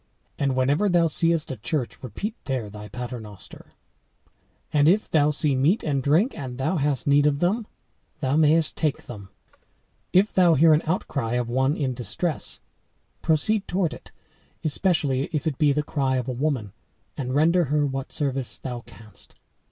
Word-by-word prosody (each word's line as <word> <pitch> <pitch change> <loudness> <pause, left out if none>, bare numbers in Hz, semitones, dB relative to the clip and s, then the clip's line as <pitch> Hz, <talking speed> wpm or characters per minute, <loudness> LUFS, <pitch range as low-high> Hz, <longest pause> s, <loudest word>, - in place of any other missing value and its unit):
And 135 -2 +1
whenever 145 +10 +2
thou 175 -2 +3
seest 165 -1 +1
a 130 - -5
church, 125 +4 -3
repeat 165 - -5
there 125 -6 -3
thy 105 0 -9
pater 125 +1 -6
noster; 105 -3 -12 1.0
and 145 -1 +4
if 200 +6 +3
thou 150 -2 +3
see 150 -1 +1
meat 150 - +2
and 140 -3 0
drink, 160 - +2
and 130 -4 -7
hast 145 -2 0
need 145 +1 +4
of 145 -1 +1
them, 205 +8 0 0.5
thou 130 +1 0
mayest 155 +1 +4
take 150 -4 -1
them. 100 -5 -10 0.8
If 195 +4 +3
thou 175 -3 +5
hear 160 +3 +6
an 150 - +3
outcry 140 -8 -2
of 120 -1 -1
one 130 +4 +1
in 135 -3 -1
distress, 125 - -3 0.6
proceed 195 +7 +1
toward 180 -3 0
it, - - -12 0.5
especially 150 -5 0
if 150 - -1
it 150 -5 -2
be 150 -2 +4
the 150 +1 0
cry 135 -3 -1
of 125 -1 -2
a - - -1
woman, 125 -6 -2 0.4
and 130 -1 -3
render 170 +4 +3
her 150 +1 +1
what 135 -1 -4
service 135 -3 -2
thou 125 -2 -5
canst. 110 -3 -16
145 Hz, 165 wpm, -24 LUFS, 130-160 Hz, 1.0 s, hear